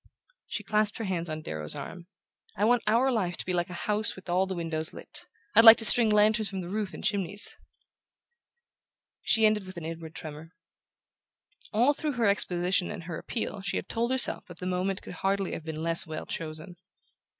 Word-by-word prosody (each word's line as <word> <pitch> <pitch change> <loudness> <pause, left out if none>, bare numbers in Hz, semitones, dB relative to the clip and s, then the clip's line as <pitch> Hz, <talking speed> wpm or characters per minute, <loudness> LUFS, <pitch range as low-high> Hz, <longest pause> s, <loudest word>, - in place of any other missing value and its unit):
She - - -4
clasped 210 0 0
her 230 - -4
hands 175 -4 -2
on 155 0 -5
Darrow's 75 - -1
arm. 175 0 -8 0.5
"I 210 - +2
want 240 +1 +3
our 240 +5 +3
life 185 -7 -1
to - - -4
be 185 - -2
like 175 0 -1
a 180 - -7
house 210 +1 +1
with 190 -1 -12
all 185 +2 +1
the 190 - -4
windows 160 -2 -3
lit: - - -10 0.3
I'd 225 - +8
like 225 0 +11
to 225 - +1
string 230 0 +5
lanterns 215 0 +3
from 190 -1 -5
the 175 - -7
roof 205 -1 -3
and - - -9
chimneys!" 200 0 -1 1.7
She 220 -1 +3
ended 210 -3 +1
with 185 -1 -10
an 165 - -6
inward 165 -1 -7
tremor. 155 +2 -9 1.2
All 250 +6 +3
through 300 0 -3
her 240 -2 0
exposition 180 -2 +3
and - - -7
her 165 -1 -6
appeal 220 -3 -4
she 190 -2 -2
had - - -5
told 235 +1 -1
herself 260 0 +2
that 175 - -12
the 180 - -7
moment 185 +1 -2
could - - -9
hardly 195 -1 0
have - - -5
been 160 0 -5
less 165 0 +3
well 155 -1 -6
chosen. 160 +3 -6
190 Hz, 200 wpm, -28 LUFS, 170-215 Hz, 1.7 s, like